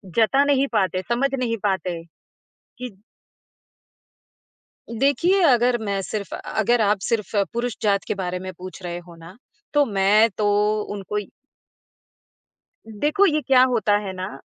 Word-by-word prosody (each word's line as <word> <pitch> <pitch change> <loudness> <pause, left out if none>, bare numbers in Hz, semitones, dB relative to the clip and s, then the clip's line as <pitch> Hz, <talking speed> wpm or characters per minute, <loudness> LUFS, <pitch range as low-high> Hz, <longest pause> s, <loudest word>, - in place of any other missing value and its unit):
जता 250 +5 +4
नहीं 275 -1 +2
पाते, 185 -1 +1
समझ 255 +4 +1
नहीं 235 -2 -1
पाते 185 -4 -1 0.8
कि 250 0 -5 2.1
देखिए, 335 - +2
अगर 245 -4 +4
मैं 200 -1 -1
सिर्फ़ 200 +1 -5
अगर 230 +2 0
आप 205 -1 +2
सिर्फ़ 220 -3 -2 0.2
पुरुष 235 0 -2
जात 200 -2 +1
के - - -1
बारे 180 -2 -3
में 185 +1 -6
पूछ 185 0 -10
रहे 175 0 -4
हो 170 - -13
ना 165 +5 -14 0.4
तो 290 0 +4
मैं 205 +2 +3
तो 210 - 0 0.5
उनको 205 0 -5
इ 205 -2 -3 1.6
देखो 295 - +1
ये 305 -5 +2
क्या 255 -1 +6
होता 205 -2 +2
है 190 - -5
ना 185 -7 -6
215 Hz, 140 wpm, -22 LUFS, 190-250 Hz, 2.1 s, क्या